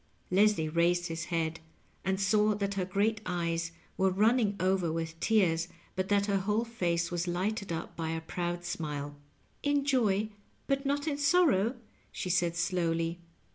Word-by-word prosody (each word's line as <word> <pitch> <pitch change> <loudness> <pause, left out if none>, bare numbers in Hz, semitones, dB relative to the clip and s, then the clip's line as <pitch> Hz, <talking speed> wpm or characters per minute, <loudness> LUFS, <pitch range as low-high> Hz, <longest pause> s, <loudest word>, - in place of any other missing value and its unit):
Leslie 195 -4 +4
raised 170 +2 +2
his 165 0 -3
head 165 -2 -1 0.4
and 190 +1 0
saw 210 +2 +3
that 200 -1 -1
her 190 -2 -1
great 210 +4 0
eyes 170 -2 -1 0.3
were 190 0 +3
running 210 +2 +3
over 185 -3 +1
with 165 0 -4
tears, 175 -7 +2 0.3
but 185 0 -2
that 200 -1 +3
her 200 -1 +1
whole 210 +4 0
face 170 -7 -1
was 175 0 -1
lighted 195 +3 -1
up 165 - -4
by 165 -1 -3
a 165 0 -1
proud 175 +1 -3
smile. 145 -4 -4 0.3
" - - -37
In 285 -1 +2
joy, 215 -6 +2 0.4
but 275 0 0
not 285 +1 0
in 290 -2 -1
sorrow!" 280 - +4 0.4
she 185 - -3
said 175 -2 +2
slowly. 165 -1 0
185 Hz, 165 wpm, -30 LUFS, 170-210 Hz, 0.4 s, Leslie